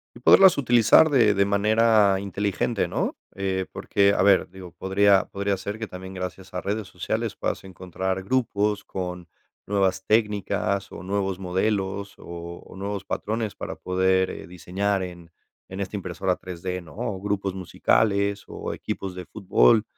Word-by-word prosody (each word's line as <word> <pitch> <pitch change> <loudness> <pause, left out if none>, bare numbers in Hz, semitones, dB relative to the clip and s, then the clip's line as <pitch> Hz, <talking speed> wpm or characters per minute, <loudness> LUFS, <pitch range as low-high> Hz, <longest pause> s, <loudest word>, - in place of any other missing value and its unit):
Y - - -11
poderlas 190 +7 +7
utilizar 120 +3 +5
de 115 -6 +5
de 100 - +3
manera 105 0 +4
inteligente, 100 +3 -1
¿no?, - - -2 0.2
eh, 95 -1 -2
porque, 100 0 +2
a 90 - +3
ver, 100 -2 +4
digo, 95 -1 -11
podría 95 +2 +3
podría 100 0 -1
ser 100 +2 -5
que 110 - -4
también, 95 +1 -9
gracias 90 +1 -6
a 90 - -3
redes 105 0 -3
sociales - - -3
puedas - - -3
encontrar 95 0 -4
grupos 105 -3 0
con 90 -2 -5 0.4
nuevas 95 -2 +1
técnicas, 100 -2 0
o 85 - -8
nuevos 95 0 -1
modelos, 95 +1 -1
o 85 0 -8
o - - -13
nuevos 100 +1 -4
patrones 110 0 -2
para - - -6
poder, 95 0 +1
eh, - - -8
diseñar 95 +3 -2
en 85 -2 -9 0.4
en 95 - -7
esta 100 +1 -4
impresora 90 -1 -1
3 90 -2 -9
D, 90 0 -2
¿no?, 85 -2 -14
o 105 -6 -3
grupos 100 -1 -1
musicales, 100 +2 +1
o - - -5
equipos 95 -1 -5
de 90 0 -7
fútbol, 110 +2 +3
100 Hz, 160 wpm, -25 LUFS, 95-105 Hz, 0.4 s, poderlas